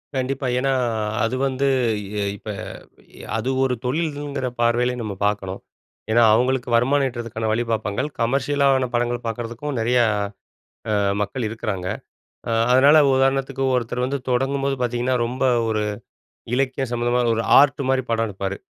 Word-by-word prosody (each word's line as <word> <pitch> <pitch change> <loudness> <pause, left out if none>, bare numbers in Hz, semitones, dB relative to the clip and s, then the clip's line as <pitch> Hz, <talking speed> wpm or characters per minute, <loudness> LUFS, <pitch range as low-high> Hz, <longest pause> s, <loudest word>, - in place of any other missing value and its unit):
கண்டிப்பா. 130 +1 -2
ஏன்னா, 135 +1 +1 0.5
அது 115 +3 0
வந்து 135 +1 -1 0.4
இ 100 - -9 0.3
இப்ப 110 - -10 0.7
எ - - -13
அது 120 +4 -2
ஒரு 130 -1 +1
தொழில்ங்கிற 145 -2 -2
பார்வையிலயே 120 +1 +2
நம்ம 105 -3 -4
பார்க்கணும். 100 -2 -2 0.5
ஏன்னா, 120 +1 +5
அவுங்களுக்கு 125 +1 +1
வருமானம் 135 +3 +3
ஈட்டறதுக்கான 115 -2 -4
வழி 120 +2 +1
பாப்பாங்கள். 110 +6 -1
கமர்ஷியலான 135 +1 +2
படங்கள் 120 0 -1
பாக்குறதுக்கும் 120 +4 -4
நெறைய 120 +2 +2 0.9
அ - - +1 0.3
மக்கள் 115 +3 -2
இருக்குறாங்க. 105 -5 -4 0.6
அ - - -1 0.2
அதனால, 140 +4 +6 0.2
உதாரணத்துக்கு, 135 0 +1
ஒருத்தர் 125 +1 -1
வந்து 140 +2 -1
தொடங்கும்போது 135 +2 0
பாத்தீங்கன்னா, 125 +1 0
ரொம்ப 130 +2 -3 0.2
ஒரு 110 -1 0 0.7
இலக்கிய 135 +1 0
சம்மந்தமான 120 0 +1
ஒரு 115 - 0 0.2
ஆர்ட் 140 0 +3
மாரி 130 0 +2
படம் 115 0 +1
எடுப்பாரு. 100 0 -4
125 Hz, 135 wpm, -22 LUFS, 115-135 Hz, 0.9 s, அதனால